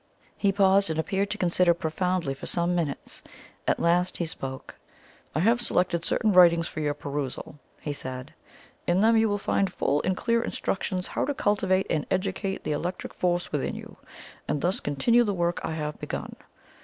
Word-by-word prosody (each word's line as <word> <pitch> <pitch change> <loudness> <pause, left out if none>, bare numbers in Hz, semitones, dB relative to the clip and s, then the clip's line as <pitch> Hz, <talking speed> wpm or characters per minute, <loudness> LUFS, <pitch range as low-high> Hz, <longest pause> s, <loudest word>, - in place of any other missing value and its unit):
He 200 - +2
paused, 195 -1 +4
and 160 - -2
appeared 195 +4 0
to 210 - -3
consider 175 -2 +3
profoundly 170 -1 -1
for 135 - -8
some 175 +1 +1
minutes. 165 -5 -3 0.5
At - - +2
last 175 +2 +2
he 170 - -1
spoke. 135 -4 -5 0.6
"I 155 - +2
have 230 +5 +3
selected 175 -6 +1
certain 220 - +1
writings 170 -2 +6
for - - -6
your 145 -1 0
perusal," 145 0 -5 0.2
he 145 - -4
said. 130 0 -6 0.5
"In 175 +2 +3
them 225 +1 +5
you 220 -1 +4
will 205 - +1
find 195 -1 0
full 145 -4 0
and 185 0 -1
clear 230 0 +1
instructions 185 -4 -2
how - - -2
to 285 +1 -2
cultivate 195 -4 +1
and 150 - 0
educate 190 +1 -2
the - - -2
electric 175 +5 -3
force 175 -1 0
within 145 -3 -1
you, - - -9 0.5
and 150 - 0
thus 180 +3 +1
continue 230 - +3
the 205 -4 -1
work 175 0 0
I - - -2
have 150 -1 -4
begun. - - -5
180 Hz, 180 wpm, -27 LUFS, 155-195 Hz, 0.6 s, writings